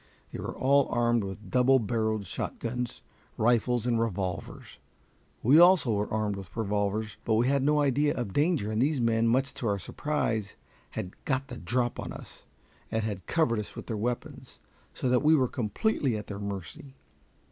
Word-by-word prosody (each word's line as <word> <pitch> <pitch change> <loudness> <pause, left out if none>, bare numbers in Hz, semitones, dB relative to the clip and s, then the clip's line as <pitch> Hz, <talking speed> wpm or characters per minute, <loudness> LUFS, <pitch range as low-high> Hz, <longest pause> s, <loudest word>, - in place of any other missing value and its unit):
They - - -6
were - - -5
all 140 +1 +4
armed 120 -2 +2
with 100 +2 -7
double 130 +1 +5
barreled 110 -2 -1
shotguns, 120 +7 -4 0.4
rifles, 120 +1 +2
and 120 -2 +1
revolvers. 95 -6 -4 0.6
We 140 +8 +6
also 175 -9 +6
were 105 0 -1
armed 105 -2 -1
with 95 +2 -10
revolvers, 105 0 -1
but 110 - +1
we 120 +3 +3
had 140 0 +2
no 150 +2 +3
idea 145 +1 +2
of 120 -7 -4
danger, 145 - +1
and 110 +1 0
these 145 +1 +2
men, 115 -1 +2
much 130 +4 +1
to 120 - -4
our 100 -1 +1
surprise, 110 - -2 0.3
had 90 - -5
"got 135 0 -1
the - - -7
drop" 120 -1 -1
on - - -5
us, - - -12 0.4
and 110 0 -1
had 100 -4 -4
covered 140 -10 +2
us 105 - -6
with - - -7
their 115 - -3
weapons, 120 +3 -4 0.4
so - - -2
that 125 0 +3
we 155 +1 +5
were 130 -4 +3
completely 125 - 0
at 105 - -6
their 100 -1 -6
mercy. 100 +7 -7
115 Hz, 180 wpm, -28 LUFS, 105-135 Hz, 0.6 s, We